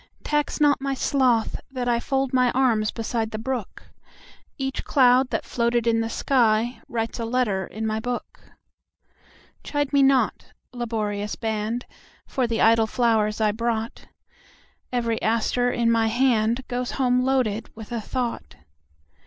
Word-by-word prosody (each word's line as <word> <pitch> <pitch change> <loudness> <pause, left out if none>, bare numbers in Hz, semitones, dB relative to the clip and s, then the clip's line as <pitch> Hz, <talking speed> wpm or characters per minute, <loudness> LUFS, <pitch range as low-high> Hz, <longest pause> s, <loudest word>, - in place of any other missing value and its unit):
Tax 295 -1 -1
not 290 -2 +3
my 275 0 -1
sloth 255 -5 +1
that 255 -2 -4
IFold 265 +3 0
my 255 -1 +4
arms 230 -5 +2
beside 225 -1 -2
the 215 - -5
brook; 240 -2 -4 0.7
Each 270 -1 -3
cloud 255 -1 +4
that - - -2
floated 235 -1 0
in 225 -1 +2
the 225 - -1
skyWrites 230 -1 0
a - - -2
letter 225 -5 0
in 220 +1 -5
my 220 0 -1
book. 245 +1 -5 1.2
Chide 290 -1 -2
me 280 - +5
not, 270 -1 +2 0.2
laborious 210 -4 -3
band, 220 +2 -3 0.4
For 255 -2 -1
the 230 -1 -1
idle 225 0 +5
flowers 220 -3 +1
I 215 -1 +3
brought; 225 +1 -3 0.8
Every 235 -2 -1
aster 230 +2 +1
in 235 -1 +1
my 225 -1 +2
handGoes 245 +1 0
home 250 -2 +2
loaded 255 -5 0
with 220 -1 -10
a 235 -2 -2
thought. 235 - -4
235 Hz, 135 wpm, -24 LUFS, 220-255 Hz, 1.2 s, me